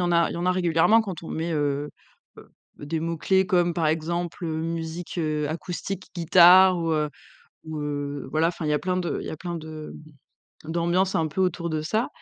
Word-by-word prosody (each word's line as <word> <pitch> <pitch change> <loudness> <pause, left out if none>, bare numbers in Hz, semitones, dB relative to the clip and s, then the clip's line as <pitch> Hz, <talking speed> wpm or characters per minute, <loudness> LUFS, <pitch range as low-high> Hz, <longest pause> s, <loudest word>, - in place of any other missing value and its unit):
en 175 0 +1
a 170 0 +4
il - - -5
y - - -5
en 170 - -3
a 185 - +3
régulièrement 180 +4 +4
quand 190 -7 -6
on - - -8
met, 165 +2 -3
heu 145 -1 -1 0.5
heu, - - -15 0.3
des 155 +2 -3
mots 165 +1 -2
clés 190 +4 +2
comme 175 -3 +2
par 165 -1 0
exemple, 170 +3 -2
heu, 160 -1 -2
musique, 165 +1 -4
heu, 155 -3 -1
acoustique, 175 +4 -5
guitare 180 +2 +7
ou 165 -1 -1
heu, 150 -1 +1 0.6
ou 160 -1 -5
heu, 145 -2 -4
voilà, 160 +3 +2
enfin 170 -1 -5
il 150 - 0
y - - +2
a 150 - +2
plein 185 +2 -1
de 180 -2 -2
il - - -7
y - - -4
a - - -5
plein 175 +2 -5
de 155 -1 -8 0.7
d'ambiances 170 +4 0
un 160 -1 +1
peu 155 - -4
autour 175 -2 0
de 155 -1 -1
ça 215 +10 -1
165 Hz, 220 wpm, -25 LUFS, 155-180 Hz, 0.7 s, guitare